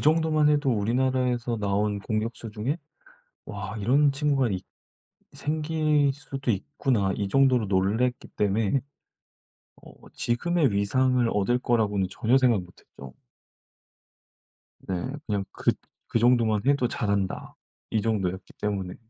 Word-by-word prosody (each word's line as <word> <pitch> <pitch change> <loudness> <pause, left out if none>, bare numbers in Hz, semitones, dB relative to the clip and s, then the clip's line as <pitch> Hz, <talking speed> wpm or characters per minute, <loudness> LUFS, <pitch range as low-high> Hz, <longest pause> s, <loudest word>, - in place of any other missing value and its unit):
정도만 155 -1 +3
해도 145 -2 +2
우리나라에서 125 +2 0
나온 100 0 0
공격수 110 +2 -3
중에 115 +8 -2 0.7
'와 100 +1 -6
이런 140 +7 +3
친구가 140 -2 +1
있 95 -2 -3 0.7
생길 150 -2 +1
수도 140 -2 -4
있구나.' 115 -2 0
이 100 -1 -2
정도로 130 -2 +3
놀랐기 105 +6 0
때문에 105 +5 +1 1.0
어 - - -15 0.2
지금의 155 +3 +1
위상을 125 +5 +2
얻을 105 +5 +1
거라고는 105 -6 +1
전혀 120 +6 +2
생각 120 -6 +3
못 90 0 -14
했죠. 70 -2 -13 1.7
네. 95 - -1 0.3
그냥 100 -3 -1
그 - - +1 0.4
'그 115 - 0
정도만 115 -3 +3
해도 140 -3 +3
잘한다.' 100 -4 -2 0.4
이 110 - +1
정도였기 95 -4 -2
때문에. 95 -3 -2
120 Hz, 260 characters per minute, -26 LUFS, 100-135 Hz, 1.7 s, 정도만